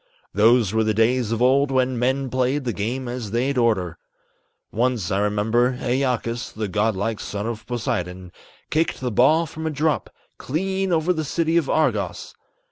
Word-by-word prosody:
Those 110 0 +4
were 110 0 +2
the 110 -1 0
days 115 +1 +2
of 115 +1 0
old 135 +2 +4
when 130 -2 +1
men 130 +2 +1
played 130 +3 0
the 120 -3 -2
game 120 +6 -3
as 120 -3 -4
they'd 125 +6 0
orter. 105 -9 +1 0.7
Once, 115 -4 0
I 95 - +1
remember, 110 +5 +1
Æacus, 125 -2 -1
the 110 -1 -4
god 105 +2 0
like 105 +3 -2
son 105 +1 -4
of 115 -1 -5
Poseidon, 90 -6 -3 0.4
Kicked 160 +1 0
the 125 -1 -2
ball 155 +10 +4
from 160 0 -6
a - - +1
drop, 155 +1 0 0.3
clean 190 +6 -1
over 165 +2 +2
the 160 -2 -2
city 165 +2 0
of 165 -5 +2
Argos. 155 - 0
125 Hz, 170 wpm, -23 LUFS, 110-140 Hz, 0.7 s, Those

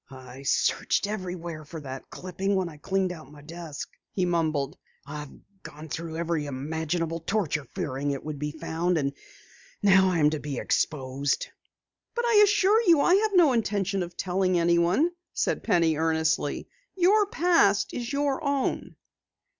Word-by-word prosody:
"I 130 0 -11
searched 140 - +1
everywhere 180 -6 -5
for 160 +2 -8
that 135 -2 -8
clipping 190 +2 -2
when 185 -2 0
I 150 - -12
cleaned 190 +4 0
out 155 -5 -10
my 145 -1 -14
desk," 165 -2 -7 0.2
he 185 - 0
mumbled. 160 -5 0 0.3
"I've 150 0 -7 0.3
gone 155 +2 -10
through 160 +1 -5
every 165 -3 -1
imaginable 160 +4 -2
torture 160 -5 -1
fearing 140 +1 -2
it 140 -1 -3
would 150 -2 -5
be 150 +1 -2
found. 165 +3 -1
And 140 -2 -1 0.7
now 190 -1 +6
I 180 - 0
am 150 -1 +4
to 155 - -2
be 145 -2 -5
exposed!" 135 -1 0 0.7
"But 475 0 0
I 470 - +2
assure 415 +1 +4
you 340 -9 +5
I 350 - +4
have 410 +1 +3
no 325 -7 +6
intention 200 -4 0
of 175 0 -6
telling 185 0 +1
anyone," 170 - +3 0.2
said - - 0
Penny 170 -6 +3
earnestly. 160 0 0 0.3
"Your 395 +3 +4
past 330 - +3
is 240 0 -4
your 285 +1 0
own." 280 -2 -1
170 Hz, 155 wpm, -27 LUFS, 150-205 Hz, 0.7 s, now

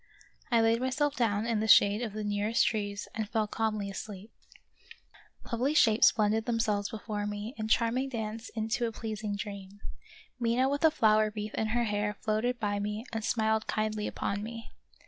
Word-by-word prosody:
I 235 -3 +4
laid 225 +1 +3
myself 275 +3 0
down 220 -3 +1
in 230 -2 0
the 220 - -1
shade 205 +1 +6
of 225 -4 -3
the 215 0 -4
nearest 205 +2 +1
trees 205 -2 -2
and 220 -2 -3
fell 220 -1 +1
calmly 215 -1 -2
asleep. 200 +1 -7 1.2
Lovely 255 +6 0
shapes 225 -5 +6
blended 220 0 +1
themselves 215 -4 0
before 210 -1 -4
me 210 +3 -5
in 215 - -2
charming 240 +4 +1
dance 225 -2 -5
into 220 +2 0
a - - -4
pleasing 215 -2 -4
dream. 200 -1 -7 0.6
Mina 240 +2 +2
with 285 +2 -2
a 320 - +8
flower 215 -7 +3
wreath 210 0 -4
in 220 - -1
her 240 +2 +1
hair 210 -1 -1
floated 225 +4 -1
by 205 -1 -1
me 210 +3 -3
and 225 -1 -2
smiled 220 -1 +1
kindly 215 -1 -1
upon 200 0 -3
me. 230 +1 -8
220 Hz, 175 wpm, -30 LUFS, 210-230 Hz, 1.2 s, a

